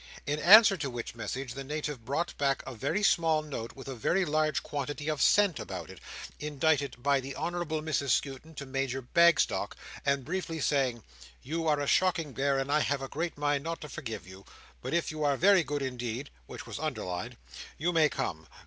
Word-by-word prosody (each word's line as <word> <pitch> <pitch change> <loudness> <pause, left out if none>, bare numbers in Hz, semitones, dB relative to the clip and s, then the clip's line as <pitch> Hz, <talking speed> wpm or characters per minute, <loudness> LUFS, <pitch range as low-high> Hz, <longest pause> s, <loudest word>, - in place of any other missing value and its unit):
In 145 +1 -1
answer 200 +3 +8
to 145 -5 -3
which 120 -2 -5
message, 120 +3 -5
the 135 - -6
Native 150 -3 -4
brought 145 +8 -2
back 140 -1 +1
a 130 - -6
very 190 - -1
small 160 -5 +3
note 125 -6 -6
with 135 -1 -10
a 135 - -4
very 175 - +1
large 155 0 +1
quantity 145 0 -4
of 150 -3 -1
scent 205 -6 +4
about 90 -5 -6
it, - - -12 0.4
indited 145 -3 0
by 140 0 +3
the 135 +1 -6
Honourable 170 -3 -2
Mrs 140 -3 -1
Skewton 140 +6 -1
to 140 - -6
Major 135 -1 -2
Bagstock, 170 +6 +3 0.3
and 140 -2 +1
briefly 165 -1 -3
saying, 130 -6 +1 0.4
"You 165 +4 -2
are 150 -2 +3
a 145 - -1
shocking 165 -3 +2
bear 140 0 +1
and 135 +1 -1
I 150 - +4
have 140 -2 0
a - - -4
great 165 +4 -3
mind 145 -1 0
not 165 +1 -3
to 150 - -8
forgive 115 - -6
you, 95 +1 -12 0.4
but - - -2
if 170 - 0
you 155 -1 -4
are 140 -2 +2
very 190 +1 +5
good 145 -1 -3
indeed," 125 0 -4 0.2
which - - -8
was - - -6
underlined, 90 -1 -4 0.4
"you 175 +4 0
may 155 -2 +4
come. 80 - -4
145 Hz, 200 wpm, -30 LUFS, 135-160 Hz, 0.4 s, answer